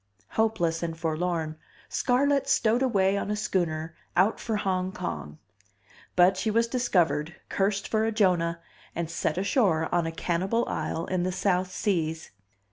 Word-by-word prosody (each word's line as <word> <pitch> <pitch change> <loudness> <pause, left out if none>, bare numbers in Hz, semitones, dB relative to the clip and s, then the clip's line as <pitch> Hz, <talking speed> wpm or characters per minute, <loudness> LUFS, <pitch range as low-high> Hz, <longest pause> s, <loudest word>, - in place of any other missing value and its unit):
Hopeless 175 -7 +1
and 165 -1 -3
forlorn, 160 -1 -2 0.3
Scarlett 275 +2 +1
stowed 235 -1 +3
away 195 -7 +2
on - - -4
a 210 - 0
schooner 165 -6 -1 0.2
out 195 +5 +3
for 225 - -2
Hong 185 -2 -1
Kong. 75 - -5 0.8
But 185 +1 +5
she 190 +4 0
was 230 +2 +2
discovered, 175 - +1
cursed 200 0 0
for 220 0 +1
a 225 - +1
Jonah, 175 -6 +1 0.3
and 170 -1 -3
set 165 -1 -1
ashore 185 - +1
on 170 -2 +2
a - - -2
cannibal 185 +8 0
isle 165 +1 -2
in 185 -1 -1
the 185 +1 0
South 185 0 0
Seas. 165 -5 -1
185 Hz, 150 wpm, -27 LUFS, 165-210 Hz, 0.8 s, But